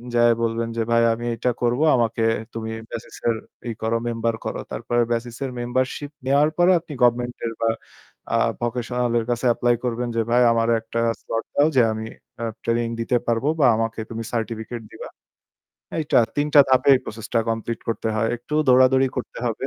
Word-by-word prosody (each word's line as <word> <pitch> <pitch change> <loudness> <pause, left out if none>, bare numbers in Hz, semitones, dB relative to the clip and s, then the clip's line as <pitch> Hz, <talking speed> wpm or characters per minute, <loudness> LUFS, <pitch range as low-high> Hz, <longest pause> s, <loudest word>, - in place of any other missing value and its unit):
যেয়ে 120 0 +5
বলবেন 115 0 -1
যে, - - +1
"ভাই 115 0 +4
আমি 120 +1 -5
এইটা 125 +2 0
করব। 120 +1 +1 0.2
আমাকে 115 -2 0 0.3
তুমি 110 -1 -4 0.2
BASIS 115 0 -7 0.5
ই - - -1
করো, 110 +1 0
member 115 0 -1
করো।" - - -3
তারপরে 120 0 0
BASIS 120 0 -2
এর 130 - -4
membership 130 +4 -2
নেওয়ার 140 +3 +4
পরে, 175 +1 +5
আপনি 160 -2 -10
government 120 0 +2
এর 115 - -2
বা 115 - +3 0.7
আ - - +4 0.2
vocational 120 0 -1
এর 115 - -3
কাছে 120 +1 -2
apply 120 +1 +2
করবেন 120 0 -1
যে, 115 - +2
"ভাই, 120 +1 +4
আমারে 115 0 +2
একটা 115 +1 -4 0.2
slot 115 0 -3
দাও, 145 - +5
যে 130 - +6
আমি 110 0 -5 0.4
আ - - -2 0.2
training 115 0 0
দিতে 120 +2 +1
পারব 115 +2 0
বা 140 - +5
আমাকে 115 0 -2
তুমি 115 0 -5
certificate 115 0 -4
দিবা।" - - -8 0.9
এইটা, 155 -2 +2 0.2
৩ 145 0 +1
টা 145 - +10
ধাপে 130 +1 +3
এই - - +3
process 110 0 -7
টা 115 - +5
complete 115 0 -3
করতে 115 0 -1
হয়। 115 +1 +1
একটু 120 +5 -7
দৌড়াদৌড়ি 130 +1 +5
করতে 125 - -5
হবে। 120 +3 -2
120 Hz, 185 wpm, -23 LUFS, 115-125 Hz, 0.9 s, টা